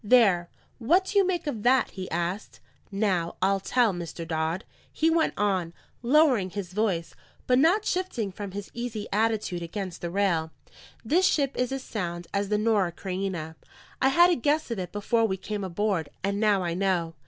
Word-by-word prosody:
"There, 205 -7 +4 0.3
what 345 +11 +3
do 405 +1 +2
you 385 - +3
make 355 -3 -1
of 245 -8 -3
that?" 255 +4 +3
he 185 -2 -6
asked. 175 +5 -3 0.3
"Now, 195 -5 0
I'll 195 +1 +2
tell, 230 +1 +2
Mr. 170 -1 -6
Dodd," 160 +4 -2 0.3
he 320 +1 +2
went 325 -1 +2
on, 185 -5 0 0.3
lowering 250 -6 +4
his 185 -2 -6
voice, 190 -6 -1 0.3
but 250 0 +3
not 365 +9 +3
shifting 360 - -1
from 200 +1 -6
his 195 +1 -7
easy 235 -3 -4
attitude 215 -4 0
against 185 +1 -5
the 170 - -3
rail, 175 -4 +1 0.6
"this 355 +11 +3
ship 280 -2 +1
is 250 0 -1
as 270 -1 -3
sound 175 -5 -4
as 200 0 -1
the 210 - +2
Norah 210 -5 +1
Creina. 185 -4 -4 0.5
I 265 - +5
had 345 +5 +6
a - - +3
guess 295 0 0
of 230 - -2
it 180 -2 -5
before 225 +3 +1
we 190 -2 -2
came 205 +1 -4
aboard, 190 -3 -1
and 200 +1 -1
now 205 -3 +3
I 170 -1 -1
know." 180 -3 0
205 Hz, 185 wpm, -27 LUFS, 180-245 Hz, 0.6 s, had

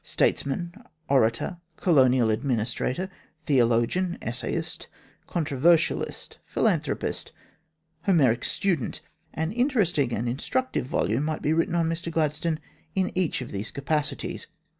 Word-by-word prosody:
Statesman, 170 +5 0 0.4
orator, 130 +5 +2 0.2
Colonial 130 -8 +4
Administrator, 125 - -1 0.4
theologian, 130 +7 +2
essayist, 120 +1 -4 0.4
controversialist, 160 +1 +1
philanthropist, - - -1 0.8
Homeric 130 - +4
student 180 - 0 0.3
an 160 +2 -1
interesting 210 - +2
and 115 +1 -1
instructive 145 - -1
volume 125 0 +1
might 155 0 -2
be 150 - +2
written 165 +1 +1
on 165 -1 +2
Mr 165 +1 -2
Gladstone 160 0 0 0.4
in 190 -1 +1
each 180 -7 0
of 120 - -9
these 100 +2 -3
capacities. 150 +2 -2
150 Hz, 105 wpm, -26 LUFS, 125-175 Hz, 0.8 s, Colonial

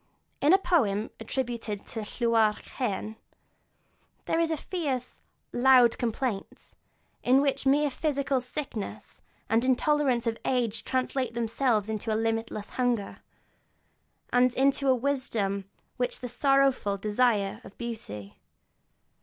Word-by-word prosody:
In 290 - +3
the 380 - +8
poem 225 - +1
attributed 235 -5 -3
to - - -5
Llywarch 220 -1 +1
Hen 220 -3 -3 1.1
there 325 - +1
is 335 -1 +2
a 320 - 0
fierce, 280 -7 -3 0.3
loud 250 -1 +5
complaint, 235 -3 -3 0.5
in 255 +2 +4
which 275 -1 0
mere 290 +1 +3
physical 280 -2 0
sickness 250 -4 -6 0.3
and 225 +1 +3
the 255 - -1
intolerance 265 -2 +2
of 230 -1 -1
age 235 -4 0
translate 255 -2 -1
themselves 230 -2 +1
into 220 +1 -3
a 215 - +1
limitless 225 -2 -2
hunger, 245 -5 -1 1.2
and 245 0 +4
into 275 +1 +2
that 260 - +5
wisdom 230 -7 -1 0.3
which 245 0 0
is - - -5
the 250 - -4
sorrowful 270 -5 +2
desire 210 -1 +1
of - - -14
beauty. 105 - -7
245 Hz, 125 wpm, -28 LUFS, 220-270 Hz, 1.2 s, the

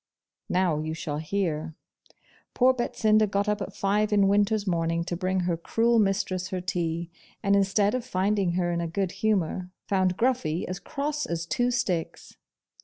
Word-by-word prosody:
Now, 180 -4 +2
you 155 +1 -3
shall 150 -2 -4
hear. 160 -2 -2 0.8
Poor 260 +1 +5
Betsinda 215 -3 +2
got 200 +1 0
up 210 0 0
at 195 - -4
five 205 +2 +1
in 200 -2 +4
winter's 205 +1 +2
morning 165 -2 0
to 175 - -3
bring 185 +1 0
her 175 -1 0
cruel 230 +7 +2
mistress 195 -2 0
her 185 -1 -3
tea; 170 -2 -2 0.3
and 200 0 +3
instead 200 +1 +2
of 255 -1 -1
finding 195 -4 0
her 175 -1 0
in 170 0 -1
a 170 - -2
good 185 +2 -1
humour, 190 -3 -1 0.2
found 185 -2 +1
Gruffy 235 -10 0
as 185 0 -4
cross 295 0 -3
as 170 0 -3
two 245 +8 0
sticks. 190 -9 -2
190 Hz, 170 wpm, -27 LUFS, 170-210 Hz, 0.8 s, Poor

